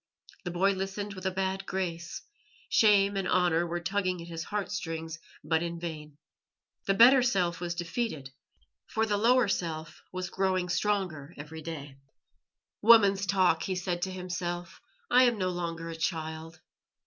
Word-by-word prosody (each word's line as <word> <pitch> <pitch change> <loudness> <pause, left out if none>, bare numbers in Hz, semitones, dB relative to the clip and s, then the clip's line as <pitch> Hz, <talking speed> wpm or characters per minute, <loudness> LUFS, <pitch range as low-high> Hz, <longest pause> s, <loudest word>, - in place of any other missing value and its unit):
The - - -2
boy 185 +3 +2
listened 195 +1 -4
with 190 -1 -4
a - - +3
bad 190 +1 -2
grace 175 -3 -4 0.5
shame 200 -2 +4
and 195 -1 -1
honour 175 -2 +2
were 175 +1 -2
tugging 185 0 -1
at 170 0 -9
his 165 -1 -5
heart 210 -1 -3
strings, 165 -4 -4 0.2
but 160 +2 +1
in 170 0 -4
vain. 155 -3 -7 0.7
The 195 - +3
better 250 +5 +8
self 180 -8 +1
was 175 -1 -3
defeated, 170 - -3 0.6
for 220 0 0
the 210 -2 0
lower 240 +2 +4
self 160 -4 -3
was 185 0 -4
growing 185 -2 0
stronger 180 -7 -1
every 155 +2 -8
day. 145 -4 -7 0.8
"Woman's 200 -3 +6
talk," 185 -5 +3
he 185 +2 -2
said 180 -1 -2
to 190 - -1
himself. 175 -1 -5 0.3
"I 250 +1 +7
am 240 -2 +2
no 185 -2 0
longer 170 -2 -4
a - - -6
child." 160 -1 -4
180 Hz, 160 wpm, -29 LUFS, 165-195 Hz, 0.8 s, better